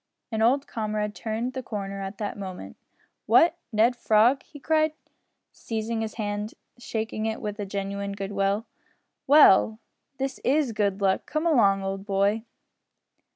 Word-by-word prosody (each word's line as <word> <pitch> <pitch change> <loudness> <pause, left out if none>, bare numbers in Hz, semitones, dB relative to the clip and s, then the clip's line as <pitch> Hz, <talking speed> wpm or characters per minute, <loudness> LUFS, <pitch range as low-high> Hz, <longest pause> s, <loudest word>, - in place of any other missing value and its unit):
An 220 -1 -1
old 265 +5 +3
comrade 215 -2 -3
turned 230 +3 -3
the 260 - -4
corner 200 -4 -5
at 195 +1 -6
that 205 -2 -4
moment. 190 -3 -7 0.5
"What! 340 +1 +5
Ned 225 +3 +3
Frog!" 235 +3 +3
he 290 - -14
cried, 310 +2 +2 0.6
seizing 225 0 -3
his 220 -1 -4
hand 210 0 -3 0.2
and 245 - -17
shaking 220 -1 -3
it 220 0 -3
with 210 -1 -5
genuine 200 0 -3
goodwill. 200 +2 -1 0.6
"Well, 240 -7 +6 0.4
this 270 0 -3
is 280 -1 +2
good 205 -2 -1
luck. 190 -1 +1
Come 310 +2 -2
along, 200 -11 +4
old 195 0 -3
boy!" 200 +3 +1
215 Hz, 145 wpm, -26 LUFS, 200-245 Hz, 0.6 s, Well